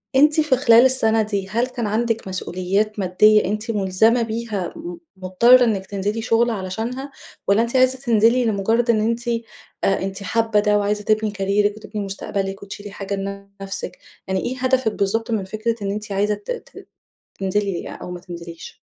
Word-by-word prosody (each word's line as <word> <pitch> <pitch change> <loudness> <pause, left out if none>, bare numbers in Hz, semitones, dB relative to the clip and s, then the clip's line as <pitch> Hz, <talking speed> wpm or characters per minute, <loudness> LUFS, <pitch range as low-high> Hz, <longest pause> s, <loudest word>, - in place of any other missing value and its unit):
أنتِ 305 +3 +5
في 300 -4 +2
خلال 235 -1 +6
السنة 225 -4 +3
دي 200 -2 -2
هل 235 +4 0
كان 245 -4 -4
عندِك 225 0 -1
مسؤوليات 190 +3 -1
مادية 210 +3 +4
أنتِ 215 +3 -2
ملزمة 210 +4 +2
بيها 220 -4 -3
م 345 +2 -7 0.2
مضطرة 235 +7 +5
إنِك 205 -5 0
تنزلي 205 +3 -3
شغل 230 +1 +2
علشانها، 225 +7 -4 0.4
والَّا 200 +3 +4
أنتِ 235 +2 -2
عايزة 255 0 +3
تنزلي 235 0 +3
لمجرد 225 +3 +1
إن 220 -2 +4
أنتِ 230 +2 0 0.6
أنتِ 195 0 -1
حابة 225 0 +1
ده 210 0 +2
وعايزة 205 0 -1
تبني 215 0 +1
كاريرِك 205 +1 0
وتبني 210 -1 -6
مستقبلِك 195 0 -4
وتشيلي 205 0 -8
حاجة 200 0 -4 0.5
لنفسِك، 195 0 -5 0.3
يعني 190 0 0
إيه 255 +6 -3
هدفِك 255 -3 +1
بالضبط 225 +4 -1
من 210 -4 0
فكرة 215 +4 -2
إن 200 0 -2
أنتِ 210 0 -5
عايزة 205 +2 +1
ت 205 - -8
ت - - -8 0.5
تنزلي 195 -1 -1
أو 180 - -7
ما 180 - -6
تنزليش؟ 170 -2 -10
215 Hz, 165 wpm, -21 LUFS, 195-235 Hz, 0.6 s, خلال